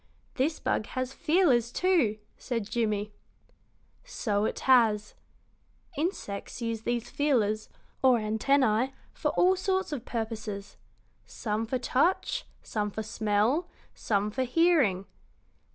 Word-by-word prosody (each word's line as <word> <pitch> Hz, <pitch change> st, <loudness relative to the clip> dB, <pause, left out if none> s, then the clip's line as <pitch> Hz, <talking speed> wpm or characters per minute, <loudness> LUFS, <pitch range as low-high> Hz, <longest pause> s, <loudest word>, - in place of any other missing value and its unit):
"This 295 Hz, +5 st, 0 dB
bug 215 Hz, -, -1 dB
has 255 Hz, +1 st, -2 dB
feelers, 280 Hz, -9 st, +2 dB
too," 320 Hz, -, +2 dB, 0.2 s
said 230 Hz, -5 st, -3 dB
Jimmie. 210 Hz, -2 st, -1 dB, 0.9 s
"So 215 Hz, -, -1 dB
it -, -, -3 dB
has. 225 Hz, -5 st, +4 dB, 0.8 s
Insects 290 Hz, -, -3 dB
use 230 Hz, -2 st, -3 dB
these 240 Hz, +1 st, -2 dB
feelers, 220 Hz, -7 st, +1 dB, 0.3 s
or 260 Hz, -2 st, +5 dB
antennæ, 225 Hz, +3 st, +2 dB, 0.2 s
for -, -, -1 dB
all 370 Hz, +1 st, +4 dB
sorts 380 Hz, -1 st, -1 dB
of 275 Hz, -6 st, -4 dB
purposes 220 Hz, -4 st, -5 dB, 0.5 s
some 215 Hz, -, -3 dB
for 255 Hz, -, 0 dB
touch, 265 Hz, +8 st, 0 dB, 0.2 s
some 210 Hz, -1 st, -2 dB
for 220 Hz, +2 st, -5 dB
smell, 220 Hz, -, +1 dB, 0.2 s
some 205 Hz, 0 st, -1 dB
for 260 Hz, -, -2 dB
hearing. 255 Hz, -, +3 dB
235 Hz, 115 wpm, -28 LUFS, 215-280 Hz, 0.9 s, or